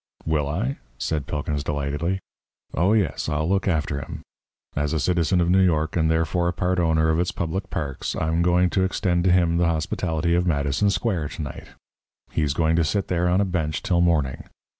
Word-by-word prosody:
"Will 75 -2 0
I?" 110 - -2 0.2
said 75 +3 -2
Pilkins, 75 0 -2
delightedly. 75 +5 -1 0.6
"Oh 90 +6 +2
yes, 100 -8 0
I'll 75 +1 0
look 100 +1 +1
after 75 -5 0
him! 70 - -8 0.5
As 75 +1 0
a 80 - +1
citizen 85 +2 +1
of 85 0 +2
New 95 +1 +5
York, 80 -4 +1
and 80 -2 +2
therefore 80 +2 +1
a 85 - 0
part 90 +1 0
owner 80 -1 +2
of 80 +1 +2
its 90 - 0
public 95 +4 -3
parks, 70 -5 -3
I'm 80 +2 0
going 90 +1 +3
to 95 - +2
extend 90 -2 0
to 90 - +4
him 85 -2 +3
the 85 0 +3
hospitality 80 +1 -1
of 90 +1 +2
Madison 70 +5 +1
Square 95 -7 0
to 80 - -3
night. 70 - -8 0.6
He's 75 -2 0
going 80 0 +2
to 85 - +3
sit 100 +5 -1
there 90 0 +1
on 90 +3 +3
a - - +2
bench 80 -5 -2
till 85 -2 +2
morning. 75 -7 +1
85 Hz, 200 wpm, -24 LUFS, 75-90 Hz, 0.6 s, New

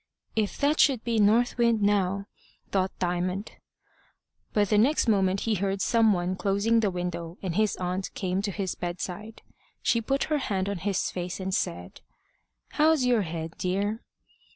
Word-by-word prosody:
"If 215 -2 0
that 295 +2 +1
should 260 -6 +4
be 230 -2 0
North 230 +4 +3
Wind 230 -3 +3
now!" 200 -1 +1 0.5
thought 190 -1 +1
Diamond. 180 +3 -2 1.0
But 205 -2 +2
the 210 - +3
next 265 +4 +3
moment 195 -3 +2
he 225 - 0
heard 195 0 -1
some 225 +1 +3
one 180 -1 0
closing 200 +4 +2
the 215 -3 +2
window, 175 -1 -4
and 185 -3 -2
his 215 +3 +1
aunt 185 +1 -3
came 185 -1 -1
to 200 0 -2
his 190 -1 -2
bedside. 180 +5 -6 0.4
She 230 - +2
put 275 +5 0
her 305 -2 0
hand 195 -7 -1
on 200 -2 -3
his 195 +1 -1
face, 180 +1 -4
and 190 0 -3
said 90 - -3 0.7
"How's 305 -3 +3
your 245 -3 +3
head, 165 -2 -5
dear?" 200 +4 -1
200 Hz, 165 wpm, -27 LUFS, 185-225 Hz, 1.0 s, should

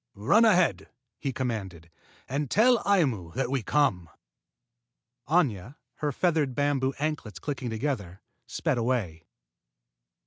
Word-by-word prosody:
"Run 200 - +4
ahead," 180 -6 +3 0.3
he 135 - -2
commanded, 100 -10 -4 0.4
"and 140 +1 -2
tell 235 - +4
Aimu 130 - +1
that 130 -1 -1
we 135 -2 0
come." 105 - +1 1.2
Aña, 135 - +1 0.2
her 150 -1 -1
feathered 155 -4 0
bamboo 140 -2 0
anklets 145 -9 -3
clicking 130 +3 -4
together, 110 -6 -3 0.3
sped - - -1
away. 110 -10 -2
130 Hz, 110 wpm, -27 LUFS, 105-150 Hz, 1.2 s, Run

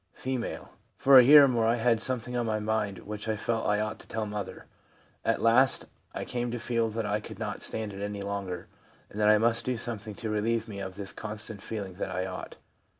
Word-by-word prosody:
F. - - -10 0.7
'For 135 -1 +8
a - - +8
year 145 +3 +9
or - - +6
more 115 -3 +1
I 115 - +3
had 115 -1 +2
something 125 -1 -1
on 120 -1 0
my 110 -1 0
mind 105 -2 -2
which 105 +1 -6
I 110 - +1
felt 115 +2 -1
I 105 0 +2
ought 110 0 -3
to - - -15
tell 110 -1 -3
mother. 105 -2 -6 0.6
At - - 0
last 120 +3 +4 0.3
I - - -3
came 120 0 -2
to 120 - -3
feel 115 -1 0
that 110 0 -3
I 105 0 0
could 105 - -10
not - - -4
stand 110 -2 0
it 100 - -7
any 100 -1 -4
longer, 100 -3 -4 0.5
and 105 - -7
that 105 - +5
I 105 - +7
must 115 +1 +2
do 125 -1 -1
something 110 -3 -5
to 110 0 -4
relieve 115 +2 0
me 100 -3 -7
of 95 -1 -6
this 100 -1 -3
constant 105 -1 -4
feeling 100 -4 -5
that - - -3
I 90 0 -2
ought. 95 -1 -7
110 Hz, 230 wpm, -28 LUFS, 105-115 Hz, 0.7 s, year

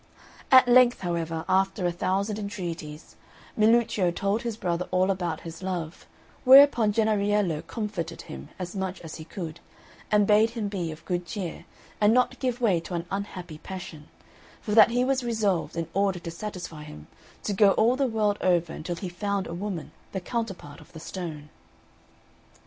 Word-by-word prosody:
At 260 -1 +8
length, 245 0 +5
however, 165 -2 -2
after 190 0 +1
a 175 - +2
thousand 195 +4 -1
entreaties, 170 -7 -6 0.4
Milluccio 220 -4 +3
told 200 +5 -1
his 230 -2 -4
brother 175 -3 -2
all 185 +1 +2
about 175 -4 -3
his 165 +1 -9
love; 175 -3 -5 0.4
whereupon 260 -5 +7
Jennariello 205 -6 +1
comforted 210 -7 -4
him 65 +1 -9
as 180 +1 -6
much 190 -1 -3
as 160 -2 -8
he 160 - -8
could, 165 -1 -7 0.5
and 210 -1 +4
bade 215 +2 +5
him 210 -3 -2
be 180 -5 -3
of 155 +1 -11
good 175 -1 -2
cheer, 190 -6 -5 0.4
and 210 +2 +5
not 250 0 +2
give 250 -2 -1
way 205 -8 +3
to 175 +2 -6
an 170 0 -3
unhappy 185 -5 -5
passion; 180 -6 -8 0.5
for 210 - -6
that 220 +2 +7
he 245 +1 +1
was 265 -1 +1
resolved, 215 -9 0
in 165 -1 -2
order 195 -1 +1
to 170 -1 -7
satisfy 175 -4 -7
him, 75 - -11 0.4
to 205 - -1
go 200 0 +5
all 235 +3 +3
the 270 0 +1
world 215 -3 0
over 175 -3 +2
until 175 +3 -5
he 185 - -5
found 195 +2 -2
a 165 - -6
woman 180 -2 -5 0.2
the 190 - -1
counterpart 195 - -5
of - - -17
the 160 - -9
stone. 155 -4 -7
190 Hz, 170 wpm, -26 LUFS, 170-215 Hz, 0.5 s, At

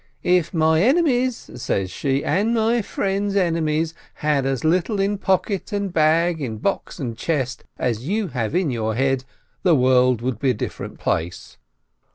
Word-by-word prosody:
— - - -39 0.2
"If 170 -1 -7
my 160 -1 +3
enemies," 255 - +2
says 95 -4 -1
she, 135 0 -1
"and 220 +5 +1
my 230 +1 +2
friends' 200 0 -2
enemies, 165 -3 +1 0.2
had 150 -3 0
as 135 -3 -1
little 180 +6 +1
in 200 +1 0
pocket 190 +1 0
and 200 -3 -2
bag, 160 +1 +2
in 115 -5 -3
box 195 - -2
and 125 -8 -4
chest, 135 -3 -2
as 115 -2 -1
you 205 0 -1
have 125 +1 -2
in 175 -6 +1
your 110 -2 -1
head, 135 0 +1 0.4
the 175 -4 +4
world 125 -2 +3
would 125 -4 -2
be 135 - +1
a - - +3
different - - -6
place." 85 +2 -3
160 Hz, 170 wpm, -22 LUFS, 130-195 Hz, 0.4 s, the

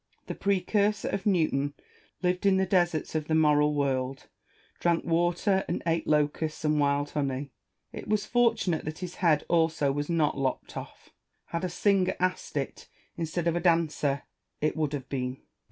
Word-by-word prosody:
The - - -4
precursor 200 +1 +1
of 195 +1 -2
Newton 150 -7 +1 0.5
lived 180 +2 +1
in 190 -1 +4
the 190 - +2
deserts 175 -4 +1
of 155 -1 -2
the 160 - +1
moral 150 -1 +4
world, 135 -2 -1 0.5
drank 170 -1 +1
water, 175 +3 +2
and 175 - -2
ate 165 0 0
locusts 150 +1 0
and 150 0 +2
wild 145 0 +1
honey. 140 -1 -2 0.4
It - - -7
was 210 -1 +1
for 240 -1 +3
tunate 175 -7 -1
that 155 +1 -4
his 180 - -10
head 160 -5 +3
also 160 -4 +2
was 145 +2 -3
not 160 -3 +2
lopped 135 -1 -2
off: - - -9 0.4
had 170 - -3
a 185 - 0
singer 190 +1 +2
asked 185 -4 -1
it, 135 - -4 0.3
instead 170 +1 -3
of 170 -1 +1
a - - +1
dancer, 160 -5 +1 0.4
it 155 - 0
would 155 -2 -1
have 135 -3 -4
been. 130 -2 -2
Salomon. - - -30
160 Hz, 175 wpm, -28 LUFS, 145-180 Hz, 0.5 s, in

